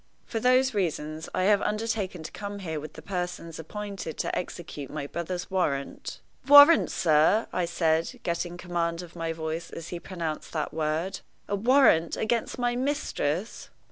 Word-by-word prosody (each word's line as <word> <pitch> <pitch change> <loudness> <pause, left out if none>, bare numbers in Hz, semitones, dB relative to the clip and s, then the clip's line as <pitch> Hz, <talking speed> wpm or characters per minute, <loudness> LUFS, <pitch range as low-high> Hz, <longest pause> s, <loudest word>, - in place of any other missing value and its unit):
For 225 - -3
those 255 +2 +4
reasons, 160 -5 -2
I 185 - 0
have 205 +1 +4
undertaken 210 -5 -2
to - - -7
come 205 0 -6
here 160 -6 -4
with 155 +1 -8
the - - -11
persons 175 -3 -4
appointed 195 0 -6
to - - -1
execute 160 -6 -5
my 150 -2 -4
brother's 175 +5 -4
warrant 145 -7 -2
" - - -28
"Warrant, 290 +3 +9
sir!" 160 +7 +3
I 180 - +1
said, 165 +8 0
getting 175 0 -2
command 170 -1 -2
of 170 -1 -13
my 165 -1 -2
voice 160 +1 -4
as 165 0 -8
he 175 - -5
pronounced 165 -4 -5
that 155 -2 -2
word 160 +4 -1 0.3
"a 200 - 0
warrant 220 - +4
against 230 +3 -1
my 245 -1 0
mistress!" 245 - -2
175 Hz, 165 wpm, -27 LUFS, 160-210 Hz, 0.3 s, Warrant